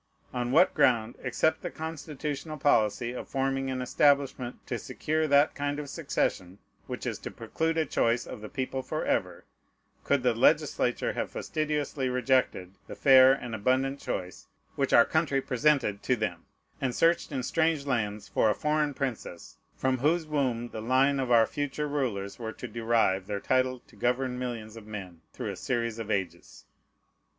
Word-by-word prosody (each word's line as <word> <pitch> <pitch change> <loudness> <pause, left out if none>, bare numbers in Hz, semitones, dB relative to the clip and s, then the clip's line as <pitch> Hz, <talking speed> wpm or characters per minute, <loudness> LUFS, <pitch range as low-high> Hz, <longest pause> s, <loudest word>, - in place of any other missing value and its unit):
On 125 0 -2
what 170 +7 +5
ground, 115 -2 +3
except 135 +5 +1
the - - -4
constitutional 155 -1 -5
policy 120 -4 +2
of 125 - -7
forming 135 0 -1
an 130 -1 -2
establishment 140 -2 +2
to - - -3
secure 155 +1 -1
that 145 +1 +4
kind 145 0 -2
of 145 -1 -5
succession 90 +1 -2 0.3
which - - -5
is - - -3
to - - -6
preclude 165 0 -2
a 160 - +2
choice 120 -3 +1
of - - -8
the 105 - -7
people 130 -2 -3
forever, - - -2 0.6
could 140 -3 +1
the 125 -2 +3
legislature 135 0 +2
have - - -3
fastidiously 150 -3 -2
rejected 125 -7 +1 0.2
the - - -8
fair 130 -1 +7
and 125 -3 -2
abundant 130 +6 0
choice 90 -1 -5 0.3
which - - 0
our - - +8
own - - -17
country 140 - +2
presented 130 -6 +1
to 125 - +1
them, 100 -7 -4 0.3
and 130 -2 -1
searched 170 0 +2
in 130 -3 -2
strange 160 0 +1
lands 105 -6 -2
for 110 - +2
a 105 - +1
foreign 150 -1 0
princess, 120 -10 -5 0.2
from 130 -1 0
whose 160 +5 +2
womb 130 -6 -1
the 110 - -6
line 130 +4 +3
of 130 -2 -1
our 115 -2 +6
future 145 +3 -3
rulers 120 -10 -2
were 110 -2 -5
to - - -7
derive 115 -4 +1
their 100 -1 -2
title 130 +2 +1
to - - -20
govern 125 +3 -1
millions 115 -3 -5
of 110 -2 -11
men 95 -6 -8
through - - -5
a - - -6
series 115 -2 -2
of 110 -2 -5
ages? 95 -4 -4
130 Hz, 170 wpm, -28 LUFS, 115-145 Hz, 0.6 s, our